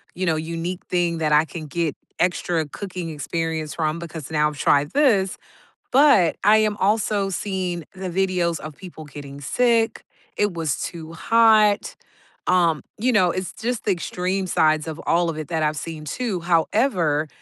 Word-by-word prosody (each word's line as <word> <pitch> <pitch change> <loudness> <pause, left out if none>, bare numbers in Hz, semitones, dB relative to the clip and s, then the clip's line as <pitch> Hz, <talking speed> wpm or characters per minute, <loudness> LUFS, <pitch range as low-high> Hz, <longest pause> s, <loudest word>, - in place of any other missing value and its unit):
you 185 - -2
know, 165 -3 +2
unique 170 +3 -4
thing 175 -2 +1
that 155 -2 0
I 150 +2 +5
can 155 -2 -8
get 165 0 -2 0.2
extra 175 -2 0
cooking 180 0 -6
experience 160 0 -3
from, 155 -1 -1
because 160 -4 -7
now 150 -1 +3
I've 150 - -10
tried 145 +2 +2
this, 225 -10 +2 0.5
but 260 - +5
I 210 +2 +6
am 215 -1 +2
also 205 -1 +1
seeing 180 -2 -3
the 185 -1 -5
videos 180 -2 0
of 155 -1 -8
people 165 -2 -10
getting 140 -1 -10
sick, 230 - +1 0.3
it 205 -3 +1
was 160 -4 -2
too 165 -1 -6
hot, 215 +2 +4 0.5
um, 170 -4 +3
you 250 +4 +1
know, 185 -5 +4
it's 185 -1 -4
just 240 +1 -3
the 205 - +2
extreme 185 +1 -2
sides 155 -3 +2
of 160 0 -5
all 170 0 +2
of 155 - -4
it 155 - -5
that 160 -2 0
I've 150 0 0
seen 160 -1 -6
too. 200 - -3
However, 170 - +1
170 Hz, 170 wpm, -23 LUFS, 155-195 Hz, 0.5 s, I